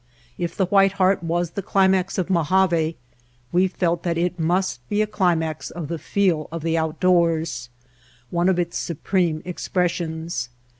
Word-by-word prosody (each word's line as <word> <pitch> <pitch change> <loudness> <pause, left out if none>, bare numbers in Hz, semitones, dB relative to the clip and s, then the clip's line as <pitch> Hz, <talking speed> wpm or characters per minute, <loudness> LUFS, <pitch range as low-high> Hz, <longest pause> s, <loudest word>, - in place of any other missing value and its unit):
If 175 -1 -4
the 190 - +3
White 195 +1 +4
Heart 190 0 +2
was 170 0 -1
the 200 - -4
climax 190 -1 +2
of 185 - 0
Mojave 170 -2 +2 0.5
we 185 +2 +3
felt 175 -2 -1
that 170 -2 -1
it 180 +1 -1
must 175 -3 0
be 210 +1 +2
a - - 0
climax 170 -6 0
of 160 -4 -6
the 170 -1 -3
feel 180 -6 +1
of 165 -1 -5
the 165 0 0
outdoors, 165 -3 +1 0.6
one 175 +2 +2
of 185 - +2
its 175 -1 -1
supreme 170 -1 -1
expressions. 170 -6 -2
175 Hz, 155 wpm, -23 LUFS, 165-185 Hz, 0.6 s, White